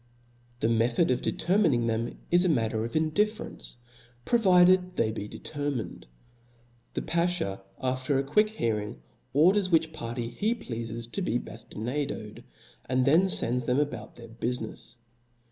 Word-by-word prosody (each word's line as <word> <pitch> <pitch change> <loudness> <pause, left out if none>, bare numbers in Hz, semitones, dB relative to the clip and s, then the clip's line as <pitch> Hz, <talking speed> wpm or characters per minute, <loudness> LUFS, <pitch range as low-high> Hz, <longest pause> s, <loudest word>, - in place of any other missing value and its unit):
The - - +3
method 115 +7 +2
of 125 - +1
determining 165 - +2
them 115 +1 -1
is 175 +1 +6
a 185 - +2
matter 110 -6 +1
of 115 - -5
indifference, 200 - -1 0.5
provided 185 -4 +4
they 110 - +1
be 105 -2 -5
determined. 130 - -5 0.9
The - - -2
ba(haw, 170 - 0 0.2
after 130 +1 0
a 135 - +1
quick 210 +10 +3
hearing, 105 - -2 0.3
orders 185 +7 +4
which 160 -2 +2
party 120 -5 -4
he 210 - -1
pleafes 115 - -5
to 200 - -3
be 120 -10 0
baftinadoed, 115 0 -5 0.4
and 130 0 +1
then 165 +8 +5
fends 125 -8 +1
them 125 +3 +2
about 145 0 -3
their 115 -1 -12
bulinefs. 115 0 -5
130 Hz, 135 wpm, -28 LUFS, 115-175 Hz, 0.9 s, is